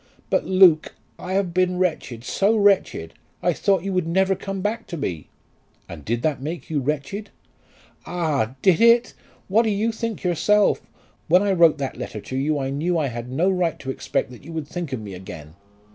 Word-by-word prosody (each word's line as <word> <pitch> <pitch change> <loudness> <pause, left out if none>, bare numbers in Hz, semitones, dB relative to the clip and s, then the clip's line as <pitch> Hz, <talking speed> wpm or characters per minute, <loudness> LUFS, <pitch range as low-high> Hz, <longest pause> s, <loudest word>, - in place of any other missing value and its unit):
"But, - - +2
Luke, 185 -4 +5 0.2
I 185 - -5
have 190 -3 0
been 180 0 +1
wretched; 155 -10 -2
so 200 - +1
wretched! 200 -2 +2 0.3
I - - +3
thought 195 -4 +1
you 195 0 -2
would 180 -3 0
never 190 +3 +2
come 195 +1 -5
back 225 +3 -2
to 170 - -5
me." 90 - -4 0.6
"And 80 -4 -9
did 120 +6 -2
that 150 -4 0
make 160 +3 -6
you 150 - +1
wretched?" 150 +9 -3 0.8
"Ah! 150 -9 -1
did 185 -2 +4
it? 235 +1 +5 0.3
What 210 +4 +4
do 225 - 0
you 215 +3 0
think 225 -1 -4
yourself? 195 +4 +2 0.5
When 180 +5 +5
I 200 - +1
wrote 170 -4 +5
that 135 -2 -4
letter 105 - -6
to 130 - -7
you 145 +3 0
I 135 -1 -2
knew 165 +5 0
I 150 -4 0
had 120 0 -6
no 170 +9 +2
right 180 -3 0
to 130 - -5
expect 130 - -2
that 125 - -13
you 160 - -10
would 160 -3 -4
think 175 -3 -5
of 130 - -2
me 105 -3 -8
again." 80 -5 -10
170 Hz, 200 wpm, -23 LUFS, 135-195 Hz, 0.8 s, Luke